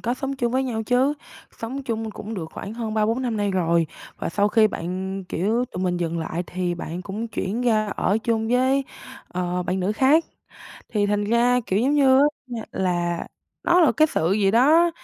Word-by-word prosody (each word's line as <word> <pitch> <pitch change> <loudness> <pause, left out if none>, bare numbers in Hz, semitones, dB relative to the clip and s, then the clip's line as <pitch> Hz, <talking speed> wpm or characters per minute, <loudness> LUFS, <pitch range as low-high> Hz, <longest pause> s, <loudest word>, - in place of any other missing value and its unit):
có 240 +1 -1
sống 270 +1 -4
chung 240 -2 -1
với 260 +1 +2
nhau 225 -4 -2
chứ, 255 +5 +2 0.4
sống 260 +5 -5
chung 225 -3 -3
cũng 215 +2 -7
được 175 -6 -4
khoảng 210 - -7
hơn 225 -2 -4
3-4 225 +4 +1
năm 235 -4 -1
nay 205 -1 0
rồi, 170 -3 +2 0.3
và - - -3
sau 205 +4 +1
khi 220 0 +5
bạn, 190 +1 -4
kiểu 220 +8 0
tụi 185 -6 -6
mình 180 -1 0
dừng 170 -1 -2
lại 165 +1 -3
thì 180 -1 -2
bạn 170 +1 -6
cũng 210 +4 -5
chuyển 215 +1 -3
ra 215 -3 +2
ở 205 - +1
chung 225 -1 -1
với, 260 +3 +2 0.4
ờ, 180 0 -2
bạn 185 +1 -2
nữ 190 +3 0
khác. 275 +8 +4 0.6
Thì 205 -2 +1
thành 205 0 0
ra, 240 +3 +3
kiểu 190 - +1
giống 275 +5 +2
á, 275 - +5
ơ, 260 -3 +2
là 175 -2 -1 0.4
nó 350 +1 +5
là 330 - +5
cái 310 - +6
sự 165 +4 +1
gì 200 -1 +3
đó, 305 +10 +5
220 Hz, 205 wpm, -23 LUFS, 185-250 Hz, 0.6 s, cái